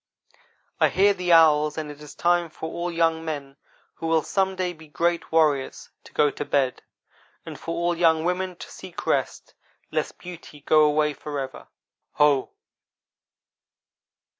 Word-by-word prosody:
"I - - +5
hear 200 +2 +4
the 180 -2 -2
owls, 155 -2 +5
and 155 -1 -4
it 145 0 -13
is 150 - -11
time 175 -1 +2
for 160 +1 -7
all 175 +1 -3
young 165 -1 +1
men 145 -3 -5 0.4
who 165 - -5
will 160 -1 +2
some 190 -1 0
day 185 -1 -2
be 160 -1 -15
great 170 +3 -1
warriors 150 -4 +1
to - - -14
go 150 -1 +3
to - - -5
bed, 130 -3 0 0.6
and - - -8
for 165 - -4
all 170 0 0
young 165 -2 +3
women 180 +1 -1
to - - -11
seek 185 -2 -9
rest, - - -1 0.4
lest - - -2
beauty 170 -4 -11
go 155 +1 +5
away 150 0 +2
forever. 140 -3 -6 0.5
Ho!" 145 -3 +3
160 Hz, 155 wpm, -24 LUFS, 150-175 Hz, 0.6 s, I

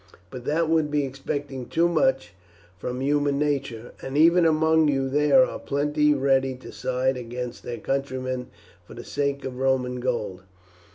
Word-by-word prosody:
But 125 -1 -8
that 160 +2 +1
would 160 -2 +2
be 145 -1 +1
expecting 135 -1 -5
too 170 +1 +2
much 130 - +1 0.5
from 125 +6 -4
human 145 0 +1
nature, 140 -6 -2
and 135 +2 -4
even 170 +2 +6
among 160 0 +3
you 135 -2 +1
there 150 - +4
are - - -6
plenty 150 +1 +1
ready 135 -1 +2
to 130 - -11
side 130 +1 -1
against 125 0 -6
their 120 - -6
countrymen 130 0 -3 0.4
for - - -13
the - - -8
sake 140 -1 -2
of 130 -1 -6
Roman 130 -1 0
gold. 110 -7 -2
135 Hz, 160 wpm, -25 LUFS, 125-150 Hz, 0.5 s, even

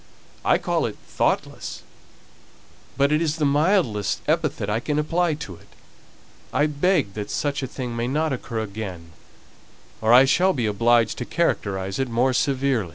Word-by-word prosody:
I - - +4
call - - 0
it - - -7
thoughtless, - - -2 1.1
but 140 +1 +3
it's 155 0 +1
the 155 -2 0
mildest 145 - +1
epithet - - 0
I 105 +2 0
can 145 +4 -2
apply 165 +2 +1
to 105 - -7
it. - - -20 0.8
I 145 - +2
beg 150 - +1
that 105 0 -5
such 145 -1 -1
a 130 - -3
thing 125 -2 -5
may 115 +1 -1
not 150 +3 0
occur 115 -3 -4
again, 95 -6 -6 0.9
or 110 +1 +2
I 125 +2 +8
shall 185 +7 +3
be 120 -4 -1
obliged 115 +2 +2
to 120 - -3
characterize 95 - -1
it 135 -1 -1
more 125 +3 +2
severely." 130 -6 +1
130 Hz, 160 wpm, -23 LUFS, 110-150 Hz, 1.1 s, I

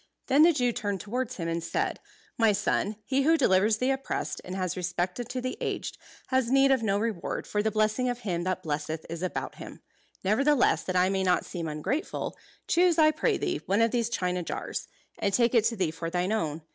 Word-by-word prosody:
Then 275 +3 +4
the 335 +2 +8
Jew 250 -6 +1
turned 205 -3 -3
towards 250 +5 -3
him 165 -3 -3
and 165 0 -2
said, 165 - -1 0.4
"My 225 -2 +4
son, 205 +1 0
he 270 +1 +1
who 320 +4 +4
delivers 210 -4 +3
the 255 +4 +1
oppressed, 270 0 -3
and 185 - -6
has 185 -2 -2
respect 180 +2 -2
unto 245 +2 -4
the 255 +1 -4
aged, - - -3 0.3
has 260 -2 +2
need 270 +1 +5
of 265 -3 +3
no 200 -3 +1
reward, 210 -5 -2
for 210 - -1
the 220 - +1
blessing 215 +3 +1
of 245 0 -3
Him 175 -6 -2
that 185 0 -2
blesseth 155 0 -3
is 170 0 -5
about 185 - -3
him. - - -10 0.4
Nevertheless, 265 +8 +3
that 185 - -2
I 180 +1 +4
may 195 0 0
not 180 -1 +2
seem 170 -3 -5
ungrateful, 160 - -3 0.3
choose, 345 -1 +3
I 310 -1 +6
pray 310 - +1
thee, 360 -3 -2
one 200 +4 +3
of 230 - +2
these 235 -2 0
china 180 -5 -1
jars; 170 - -4 0.3
and 200 - +1
take 235 -1 +3
it 230 -3 +4
to 230 0 +1
thee 185 -6 0
for 165 +1 -5
thine 180 +3 -1
own. 160 -8 -1
215 Hz, 215 wpm, -28 LUFS, 180-255 Hz, 0.4 s, the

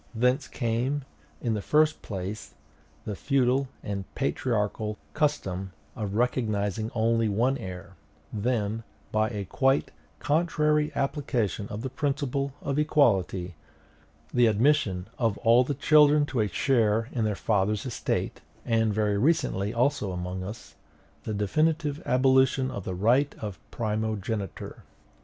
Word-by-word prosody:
Thence 125 +3 +2
came, 125 +4 -1 0.4
in 115 -3 +1
the 105 - -2
first 155 +6 +2
place, 100 +1 -6 0.5
the 105 - -3
feudal 135 +2 +1 0.2
and 100 -2 -4
patriarchal 105 - -1 0.2
custom 95 - -1 0.2
of 105 -4 -4
recognizing 110 -3 0
only 115 0 +2
one 120 +7 +2
heir; 95 0 -8 0.4
then, 110 -1 -1 0.3
by 110 0 +2
a 105 -4 -4
quite 135 +7 +1 0.3
contrary 150 -1 +1
application 120 - -1
of 105 +2 -6
the 130 - -2
principle 140 0 -1
of 140 +1 -1
equality, 95 - +2 0.8
the 120 -1 +5
admission 110 -5 +2
of 115 -5 +1
all 120 +2 +5
the 140 +2 -2
children 150 +1 +5
to 130 -4 -3
a 105 - +2
share 115 0 +2
in 115 - -1
their 105 -1 0
father's 105 +1 0
estate, 125 - -2 0.2
and, 115 -2 +1
very 105 -2 +1
recently 105 - +1
also 120 -3 +1
among 90 +1 -4
us, 105 +5 -8 0.5
the 110 - -2
definitive 150 - 0
abolition 130 0 +3
of 100 -6 -6
the 95 - -3
right 120 +9 +2
of 105 -3 -6
primogeniture. 110 -2 -3
115 Hz, 130 wpm, -27 LUFS, 105-135 Hz, 0.8 s, the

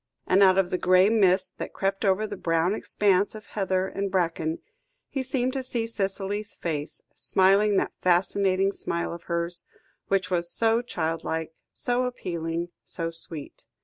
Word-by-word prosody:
And 190 +2 +4
out 190 -1 +6
of 190 -2 +2
the 180 - 0
grey 185 +2 +5
mists 190 -4 +3
that - - -5
crept 195 +1 -1
over 195 +1 +2
the 205 - -5
brown 165 0 +1
expanse 205 -1 +1
of 215 -1 -9
heather 190 -2 -1
and 195 +1 -3
bracken, 165 -3 0 0.5
he 270 - -2
seemed 260 -1 -1
to 270 - -1
see 245 -3 -2
Cicely's 205 -1 -3
face, 150 -3 -4
smiling 195 +2 +3
that - - 0
fascinating 190 +2 +2
smile 170 -4 -3
of 170 - -10
hers, 170 +1 -1 0.4
which 190 -1 0
was 175 -1 0
so 225 +1 +2
childlike, 160 -5 -3 0.2
so 245 +1 -1
appealing, 170 -7 -3
so 165 -2 -3
sweet. 165 -2 -2
190 Hz, 155 wpm, -26 LUFS, 170-205 Hz, 0.5 s, out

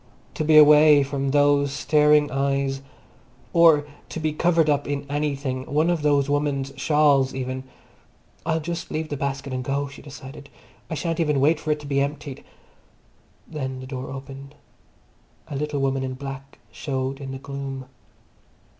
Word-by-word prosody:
To - - -2
be 155 0 +5
away 150 -1 +8
from 140 0 -2
those 145 0 +3
staring 150 +1 +3
eyes, 135 0 -1 0.7
or 165 -4 +6 0.2
to - - -5
be 155 -1 -1
covered 165 0 +2
up 145 -1 +1
in 145 0 -3
anything, 140 -3 -2
one 155 +4 +2
of 170 -3 -1
those 145 -2 +2
women's 145 -1 -1
shawls 140 -2 +3
even. 130 0 -4 0.8
I'll 160 -1 0
just 170 +2 -5
leave 155 0 -3
the 145 - -3
basket 140 -1 -3
and 130 0 -3
go, 140 +2 -1
she 135 - -12
decided. 140 0 -11 0.4
I 160 - -3
shan't 165 +1 -2
even 150 -4 +1
wait 150 +3 +3
for 155 - -6
it 150 0 +1
to - - -10
be 140 -1 0
emptied. 140 -1 -4 1.0
Then 130 -4 -5
the 130 - -8
door 130 -1 -6
opened. 135 +1 -9 0.9
A 145 - -5
little 150 +1 -2
woman 135 0 0
in 130 -1 -4
black 135 0 -8
showed 135 -1 -4
in 135 - -6
the 135 - -5
gloom. 135 -1 -6
140 Hz, 165 wpm, -24 LUFS, 135-150 Hz, 1.0 s, away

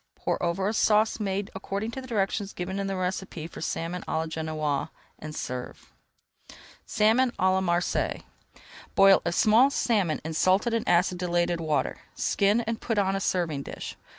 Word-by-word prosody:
Pour - - -2
over 175 +3 0
a 210 - 0
sauce 215 0 +3
made 200 -1 -2
according 200 +3 -4
to 265 - -6
directions 205 -4 -2
given 190 +2 -4
in 195 - -2
the 195 - -2
recipe 185 -3 -3
for 165 - -9
Salmon 170 +2 -3
à - - -1
la 160 - 0
Genoise, 155 -3 -2 0.3
and 155 -1 -7
serve. 125 -3 -6 1.0
SALMON 225 +5 +3
À 185 0 +2
LA 190 0 +2
MARSEILLES 175 -1 0 0.7
Boil 195 0 +7
a 170 - -1
small 220 +9 +5
salmon 205 - +1
in 160 - -3
salted 190 +8 +2
and 230 - -1
acidulated 175 -1 +1
water. 155 -2 -1 0.2
Skin 205 +3 +2
and 230 -1 -4
put 225 -2 -2
on 195 -1 +2
a 195 - -2
serving 170 -7 0
dish. - - -7
190 Hz, 165 wpm, -27 LUFS, 170-210 Hz, 1.0 s, Boil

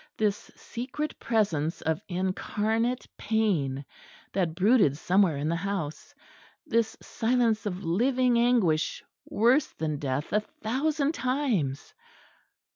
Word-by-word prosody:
this 210 0 -1
secret 265 +5 -5
presence 180 -9 0
of 160 0 -1
incarnate 215 +6 -1
pain 170 -12 0 0.5
that 175 -4 0
brooded 195 - +4
somewhere 180 -2 +3
in 145 +2 -2
the 165 - +1
house, 170 -4 -4 0.5
this 230 -5 0
silence 225 -2 +1
of 190 0 -4
living 245 +7 +2
anguish, 225 -11 +2 0.2
worse 245 +7 +3
than 155 -2 -2
death 140 +1 -2
a 210 - +5
thousand 275 +8 -1
times! 250 - -1
210 Hz, 110 wpm, -28 LUFS, 165-240 Hz, 0.5 s, a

